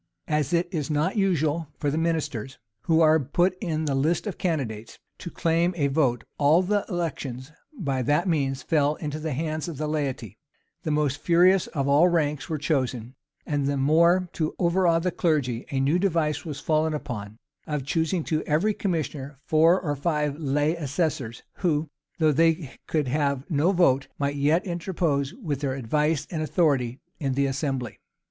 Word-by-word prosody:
As 150 -2 0
it 175 0 +2
is 155 -6 -2
not 155 +6 0
usual 165 -5 +1
for 145 - -1
the 155 - -1
ministers, 155 -7 -2 0.3
who 165 0 +3
are 160 0 +5
put 175 +7 +1
in 160 -5 -1
the 145 - 0
list 155 +8 +1
of 205 - -5
candidates, 120 - -3 0.2
to 175 - -6
claim 170 +2 +1
a 140 -3 +1
vote, 135 -4 +1 0.2
all 155 +5 +5
the 205 +2 +1
elections 145 - -4 0.3
by 140 - -1
that 145 +9 +1
means 140 -5 0
fell 150 -2 +2
into 150 0 -5
the 155 -1 -3
hands 155 +3 -3
of 165 -5 -6
the 155 - -2
laity: 135 - -3 0.4
the - - -4
most 150 -2 0
furious 180 +3 +4
of 140 -3 -2
all 145 +5 +5
ranks 150 -5 0
were 160 - -1
chosen: 130 -5 -1 0.3
and 145 -2 -1
the 140 0 0
more 170 +6 +4
to 155 -2 -2
overawe 175 -1 +3
the 180 +2 0
clergy, 140 -10 0
a 135 - -1
new 145 +6 +2
device 160 -5 0
was 150 -4 -5
fallen 155 +1 +1
upon, 105 -7 -6 0.3
of 150 -3 -3
choosing 165 +3 0
to 155 0 -1
every 165 +8 +2
commissioner 150 -8 -3
four 165 +4 +4
or 145 -4 -2
five 150 0 -1
lay 150 +2 +1
assessors, 140 -6 -2
who, 160 -4 0 0.3
though 155 -2 +3
they 165 -1 +2 0.2
could 150 -4 0
have 140 0 0
no 155 +5 +3
vote, 140 -8 +3
might 140 0 -1
yet 150 +7 +2
interpose 165 -6 -1
with 160 - -4
their 135 -2 -2
advice 150 +4 0
and 160 -3 -2
authority 140 -7 +1 0.2
in 135 -3 -1
the 140 +1 +2
assembly. 135 -3 -3
150 Hz, 175 wpm, -25 LUFS, 140-165 Hz, 0.4 s, are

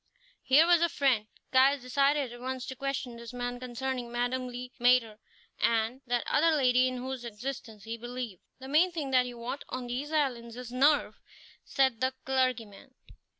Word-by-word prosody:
Here 275 +5 +5
was 345 -1 +5
a 340 - +3
friend! 260 -8 +1 0.3
Caius 265 +1 +5
decided 275 0 +1
at 240 - -11
once 260 0 -4
to 260 - -6
question 265 -2 -4
this 235 0 -9
man 245 0 -4
concerning 250 0 -4
Madame 245 +1 -1
Le 250 0 -7
Maître, 240 -3 +3 0.4
and 230 +3 +1
that 240 0 0
other 320 +1 +3
lady 255 -2 +4
in 255 0 -3
whose 260 0 -5
existence 230 -2 -7
he 225 +2 -5
believed. 240 -4 -6 0.2
"The 265 - -10
main 320 +6 +4
thing 300 -5 -4
that 255 -1 +4
you 245 -1 -8
want 245 +4 -5
on 255 -1 -4
these 255 +5 -4
islands 245 -7 -1
is 250 -1 -7
nerve," 285 +4 +2 0.4
said 265 -4 +1
the 260 0 +1
clergyman. 255 -2 -1
255 Hz, 175 wpm, -29 LUFS, 240-270 Hz, 0.4 s, Here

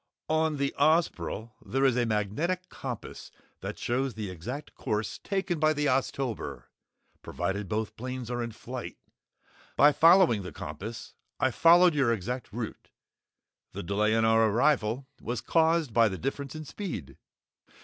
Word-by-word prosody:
"On 160 -1 +1
the 140 0 -1
Ozpril 140 - +1
there 135 +1 0
is 130 -3 +4
a 120 -1 +1
magnetic 145 - -1
compass 125 -4 -7 0.3
that - - -6
shows 130 +1 -1
the 105 -4 -4
exact 120 - -7
course 105 0 -3
taken 190 -4 -2
by 155 0 +4
the 150 0 -1
Oztober, 130 -3 -1 0.6
provided 95 +3 -3
both 110 +1 -2
planes 125 0 -5
are 120 0 -2
in 115 0 -3
flight. 125 +3 -7 0.8
By 145 - +7
following 165 - +6
the 90 - -7
compass, 95 +10 -7 0.3
I 130 - +2
followed 170 +6 +6
your 135 -5 +2
exact 115 +4 -3
route. 115 0 -6 0.8
The - - -5
delay 105 +4 +1
in 115 0 +3
our 110 0 +4
arrival 125 +1 +2 0.2
was 120 0 -3
caused 160 -4 +2
by 115 -1 +5
the 95 - -5
difference 135 +3 -4
in 155 0 -6
speed!" 155 - -6
125 Hz, 150 wpm, -28 LUFS, 110-150 Hz, 0.8 s, By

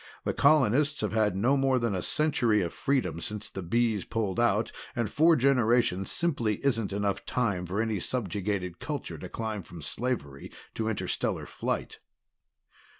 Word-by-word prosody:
The - - 0
colonists 145 0 +3
have 105 -3 -1
had 110 -3 +2
no 120 +8 +3
more 135 -1 +2
than 115 -4 0
a 95 - -1
century 120 - +2
of 85 - -4
freedom 135 - 0
since 105 +3 -5
the 95 - -5
Bees 110 +2 +1
pulled 105 -4 -2
out, 115 -2 +2 0.2
and 115 -4 -1
four 165 +2 +5
generations 120 -7 +2
simply 130 -11 0
isn't 115 -7 +1
enough 100 0 -1
time 100 -8 -1
for 95 +4 -2
any 110 -3 0
subjugated 100 -4 -2
culture 130 - -5
to 90 - -7
climb 110 -1 -3
from 85 -3 -11
slavery 70 - -3 0.2
to 110 0 -1
interstellar 110 - -2
flight." - - -3
110 Hz, 155 wpm, -28 LUFS, 95-125 Hz, 0.2 s, four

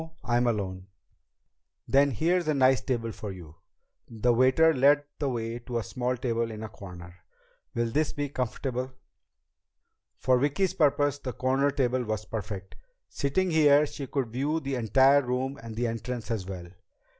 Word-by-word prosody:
I'm 120 +1 +1
alone." 95 -4 -2 1.0
"Then 140 +1 +4
here's 170 - +1
a 155 - +2
nice 130 -1 +4
table 115 -3 -2
for 105 -2 -7
you." 85 -4 -11 0.5
The 120 +1 +1
waiter 130 +7 +5
led 145 +2 +4 0.2
the 145 - 0
way 115 -1 -3
to 120 0 -4
a 115 - -1
small 125 +3 -2
table 115 -2 -1
in 110 0 -7
a 110 - -6
corner. 90 -3 -11 0.6
"Will 115 -1 0
this 150 +4 +1
be 145 0 -3
comfortable?" 130 0 -3 1.2
For 130 -1 +2
Vicki's 160 +8 +1
purpose, 145 -4 +2
the 125 -3 -5
corner 135 +2 +1
table 130 -2 0
was 110 -2 -3
perfect. 100 -3 -6 0.3
Sitting 175 +7 0
here, 150 -2 +5
she 140 -2 -7
could 130 -3 -2
view 140 +7 -1
the 140 -3 -4
entire 135 +3 +4
room 130 +2 -2
and 115 -1 -8
the 120 +2 -1
entrance 120 +1 -4
as 100 -5 -2
well. 90 -2 -7
125 Hz, 160 wpm, -28 LUFS, 115-140 Hz, 1.2 s, waiter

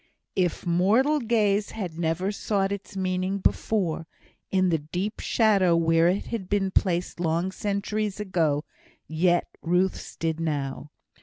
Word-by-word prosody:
If 180 -3 0
mortal 215 - +3
gaze 215 -4 +1
had 180 -7 -5
never 170 +4 0
sought 200 -1 -1
its 200 0 -6
meaning 185 +1 -1
before, 180 -5 0 0.4
in 185 -1 +2
the 165 -2 +2
deep 180 +8 -4
shadow 200 -6 +3
where 165 0 +3
it 185 +3 +1
had 200 -6 -5
been 195 -2 +1
placed 180 -2 0
long 170 +2 0
centuries 205 +1 -2
ago, 160 -7 0 0.4
yet 175 +2 +2 0.2
Ruth's 180 +2 0
did 165 -1 -2
now. 145 -3 -3
185 Hz, 135 wpm, -26 LUFS, 165-200 Hz, 0.4 s, mortal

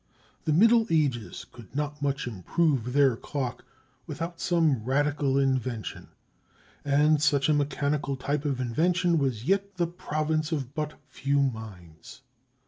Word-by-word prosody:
The 155 - +1
Middle 225 +7 +5
Ages 140 -9 0
could 120 +1 -14
not 150 0 -3
much 140 0 -1
improve 125 - 0
their 140 -3 +4
clock 130 0 -4 0.4
without 165 +1 -5
some 160 -9 +2
radical 140 +1 +1
invention; 130 -4 -1 0.8
and 145 +1 +3
such 145 -2 +3
a 155 - +4
mechanical 145 0 0
type 140 +2 -2
of 140 -4 -1
invention 170 +7 +1
was 125 -5 -1
yet 200 +3 0
the 175 -2 +1
province 155 -2 -2
of 140 -4 -3
but 150 0 -3
few 140 +1 0
minds. 105 - -5
145 Hz, 135 wpm, -27 LUFS, 130-155 Hz, 0.8 s, Middle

